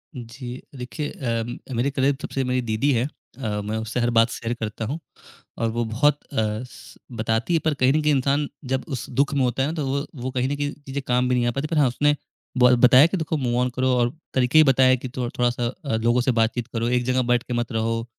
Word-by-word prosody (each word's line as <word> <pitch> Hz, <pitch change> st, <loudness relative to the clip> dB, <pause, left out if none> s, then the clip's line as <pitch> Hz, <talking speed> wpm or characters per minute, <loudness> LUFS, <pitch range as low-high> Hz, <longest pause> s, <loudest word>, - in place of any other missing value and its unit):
जी, 125 Hz, +1 st, -8 dB
देखिए 130 Hz, +4 st, -5 dB
अ, 120 Hz, +1 st, -4 dB
मेरे 125 Hz, +4 st, +1 dB
करीब 135 Hz, 0 st, +1 dB
सबसे 135 Hz, -, -2 dB
मेरी 125 Hz, 0 st, 0 dB
दीदी 115 Hz, +4 st, 0 dB
हैं 120 Hz, +2 st, +1 dB, 0.3 s
अ, 105 Hz, -5 st, -2 dB
मैं 105 Hz, +2 st, -3 dB
उससे 110 Hz, +2 st, -3 dB
हर 120 Hz, 0 st, +2 dB
बात 115 Hz, +1 st, +5 dB
शेयर 115 Hz, 0 st, -3 dB
करता 110 Hz, 0 st, -4 dB
हूँ 140 Hz, +9 st, -3 dB, 0.6 s
और 115 Hz, 0 st, 0 dB
वो 120 Hz, +1 st, -1 dB
बहुत 140 Hz, +7 st, +2 dB
अ, 110 Hz, -1 st, -1 dB, 0.5 s
बताती 115 Hz, +6 st, -1 dB
है, 165 Hz, -, +4 dB
पर 155 Hz, -, +3 dB
कहीं 130 Hz, -1 st, +3 dB
न 155 Hz, -, +2 dB
कहीं 150 Hz, 0 st, +3 dB
इंसान 140 Hz, +2 st, +1 dB, 0.3 s
जब 130 Hz, -, 0 dB
उस 130 Hz, -5 st, -5 dB
दुख 140 Hz, +2 st, +1 dB
में 140 Hz, -, +1 dB
होता 125 Hz, +1 st, +1 dB
है 140 Hz, -, 0 dB
ना, 160 Hz, -, -4 dB
तो 150 Hz, -4 st, -2 dB
वो 140 Hz, +2 st, -1 dB, 0.2 s
वो 130 Hz, -, -2 dB
कहीं 125 Hz, 0 st, 0 dB
न 145 Hz, -, -1 dB
कहीं 145 Hz, 0 st, -2 dB
चीज़ें 140 Hz, -1 st, -6 dB
काम 125 Hz, 0 st, +2 dB
भी 125 Hz, -, +2 dB
नहीं 120 Hz, -1 st, +1 dB
आ -, -, +2 dB
पाती, 135 Hz, +5 st, -3 dB
पर 165 Hz, 0 st, -2 dB
हाँ, 145 Hz, -3 st, +5 dB
उसने 145 Hz, +4 st, +2 dB, 0.4 s
ब 125 Hz, 0 st, +6 dB
बताया 130 Hz, +3 st, +8 dB
कि 190 Hz, -, -2 dB
देखो, 160 Hz, -1 st, -2 dB
मूव 125 Hz, -4 st, -1 dB
ऑन 125 Hz, -, +1 dB
करो 130 Hz, 0 st, +1 dB
और 120 Hz, 0 st, +1 dB, 0.2 s
तरीके 130 Hz, +3 st, +2 dB
भी -, -, +9 dB
बताए 130 Hz, 0 st, +5 dB
कि 130 Hz, +1 st, -7 dB
थोड़ा 125 Hz, -2 st, -1 dB
थोड़ा 120 Hz, 0 st, +4 dB
सा 120 Hz, 0 st, -2 dB, 0.2 s
अ, 135 Hz, -, 0 dB
लोगों 120 Hz, +2 st, +2 dB
से 130 Hz, -, +2 dB
बातचीत 115 Hz, 0 st, 0 dB
करो, 115 Hz, 0 st, -1 dB
एक 125 Hz, 0 st, +1 dB
जगह 130 Hz, 0 st, +2 dB
बैठ 120 Hz, 0 st, +3 dB
के 125 Hz, -, -5 dB
मत 120 Hz, -1 st, -2 dB
रहो। 115 Hz, 0 st, -1 dB
125 Hz, 250 wpm, -23 LUFS, 120-140 Hz, 0.6 s, भी